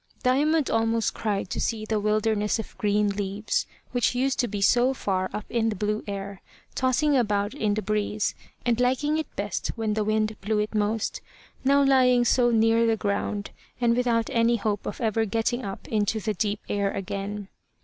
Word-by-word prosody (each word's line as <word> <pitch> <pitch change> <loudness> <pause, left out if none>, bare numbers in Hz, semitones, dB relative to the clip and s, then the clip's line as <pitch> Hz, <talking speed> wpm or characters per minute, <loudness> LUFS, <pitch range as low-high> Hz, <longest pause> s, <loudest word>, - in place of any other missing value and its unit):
Diamond 290 +4 +2
almost 225 0 +1
cried 205 -4 -2
to - - -2
see 220 -2 -1
the 215 -1 0
wilderness 210 0 +1
of 225 - -7
green 210 0 +2
leaves, 200 +1 -2 0.2
which 245 -1 +1
used 265 +2 0
to 245 - +2
be 205 -1 -4
so 245 +6 +3
far 185 -5 -1
up 210 - -5
in 225 -1 0
the 215 - -2
blue 210 +2 -1
air, 200 -1 -5 0.3
tossing 275 +3 +2
about 205 -3 +1
in 215 -7 0
the 215 - -2
breeze, 210 +1 -1 0.3
and 240 -1 +2
liking 275 +5 +1
it 315 - -6
best 200 -1 -2
when 220 -2 -1
the 215 0 0
wind 215 0 0
blew 210 +2 0
it 210 +1 -1
most, 210 +1 -1 0.4
now 280 +1 +4
lying 255 -3 +4
so 240 +1 +4
near 225 0 +3
the 225 -1 +2
ground, 205 0 -2 0.3
and 235 -1 +3
without 235 -2 +1
any 230 0 +3
hope 210 -2 -2
of - - -5
ever 225 -1 +1
getting 225 +4 -1
up 195 -2 -6
into 215 0 0
the 215 +1 -2
deep 205 +1 -1
air 200 -1 0
again. 200 +1 -4
220 Hz, 185 wpm, -26 LUFS, 205-240 Hz, 0.4 s, now